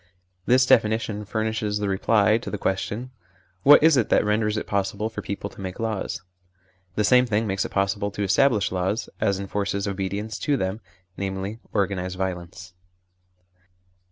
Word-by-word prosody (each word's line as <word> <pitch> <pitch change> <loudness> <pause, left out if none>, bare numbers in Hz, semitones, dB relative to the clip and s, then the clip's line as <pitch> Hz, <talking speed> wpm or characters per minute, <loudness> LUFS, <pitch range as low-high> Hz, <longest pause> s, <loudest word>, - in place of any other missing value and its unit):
This 130 +1 +5
definition 110 -2 +2
furnishes 110 0 -1
the 105 -1 -2
reply 105 +2 +3
to - - -7
the 105 - -3
question: 105 +6 -2 0.5
What 145 +5 +7
is 160 -3 +6
it 120 - +1
that - - +3
renders 105 0 +1
it - - -3
possible 100 +2 -1
for - - -5
people 100 0 -4
to - - -12
make 95 -1 -6
laws? 110 -4 -3 0.7
The 105 - +1
same 125 +4 +5
thing 110 0 +1
makes 95 -2 -1
it - - -4
possible 100 +1 0
to 100 0 -4
establish 105 +1 +3
laws, 95 +5 -1
as 100 -3 +1
enforces 100 0 -2
obedience 100 +2 -3
to 145 -2 +1
them, 95 +1 -2 0.4
namely, 95 +2 -4
organised 95 -3 -1
violence. 90 0 -5
105 Hz, 155 wpm, -24 LUFS, 95-110 Hz, 0.7 s, What